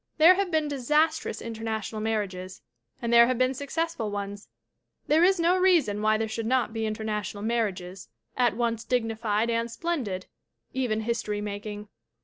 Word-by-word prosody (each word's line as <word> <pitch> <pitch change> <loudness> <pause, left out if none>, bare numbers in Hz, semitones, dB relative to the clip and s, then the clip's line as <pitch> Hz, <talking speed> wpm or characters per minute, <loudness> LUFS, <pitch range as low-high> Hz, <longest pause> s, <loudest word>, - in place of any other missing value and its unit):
"There 330 +3 +8
have 390 0 0
been 315 -2 +1
disastrous 300 +3 0
international 220 -1 -4
mar 220 -1 0
riages 185 -1 -9 0.4
and 235 0 0
there 235 0 +8
have 255 -1 0
been 255 +1 +2
successful 285 -3 -2
ones; 205 0 -5 0.6
there 315 +3 +4
is 380 0 +4
no 350 +2 +3
reason/why 215 - +3
there 220 0 -1
should 220 +1 -4
not 250 -2 +1
be 225 -1 -1
international 210 -2 -3
mar 225 -2 +1
riages 180 -1 -10 0.3
at 245 -3 +2
once 230 -2 0
dignified 225 -2 0
and 230 0 0
splendid 235 - -3 0.5
even 245 -4 0
history 215 -2 -2
making. 210 0 -5
225 Hz, 155 wpm, -27 LUFS, 210-265 Hz, 0.6 s, There